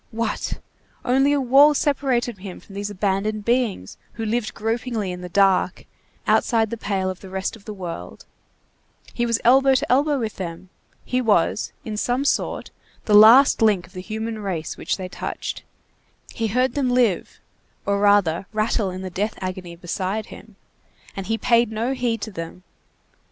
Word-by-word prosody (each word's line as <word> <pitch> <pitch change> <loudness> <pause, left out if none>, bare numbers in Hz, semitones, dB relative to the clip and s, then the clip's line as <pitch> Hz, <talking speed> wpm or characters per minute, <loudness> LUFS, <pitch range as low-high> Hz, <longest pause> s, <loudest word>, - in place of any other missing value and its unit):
What! 230 -1 -3 0.5
only 270 +3 +3
a 290 - +2
wall 275 +3 +6
separated 255 -7 0
him 185 -1 -8
from 200 - -16
those 200 +1 -4
abandoned 205 +1 -1
beings 235 - 0 0.2
who 225 - -4
lived 220 0 -2
gropingly 225 -2 -2
in 180 0 -7
the 180 - -7
dark 190 -1 +2 0.4
outside 225 -3 +2
the - - -2
pale 195 -4 -2
of 185 - -9
the 190 - -11
rest 190 +3 -3
of 215 - -17
the 215 - -6
world, 175 -3 -7 0.9
he 240 0 0
was 230 -1 +1
elbow 265 +2 +5
to 255 - 0
elbow 285 +3 +3
with 225 -4 -4
them, 180 0 -6 0.4
he 255 0 0
was, 210 -4 +1
in 215 -1 -4
some 250 +5 0
sort, - - -1 0.3
the 210 - +1
last 225 +7 +8
link 210 -5 +3
of 180 - -21
the 185 - -6
human 220 +2 -4
race 180 -6 -4
which - - -2
they 185 -1 -5
touched, 180 - -5 0.7
he 225 - -1
heard 250 +3 +1
them 275 -3 0
live, 245 -7 +1 0.5
or 200 0 +1
rather, 200 -4 +3
rattle 215 -1 0
in 185 +1 -6
the 185 - -5
death 210 +4 -2
agony 185 -2 -5
beside 185 +5 -3
him, 215 - -14 0.6
and 195 -1 -5
he 225 +1 0
paid 235 0 +3
no 230 +4 -1
heed 240 -4 -1
to 215 - -5
them! 165 0 -8
215 Hz, 170 wpm, -22 LUFS, 190-240 Hz, 0.9 s, last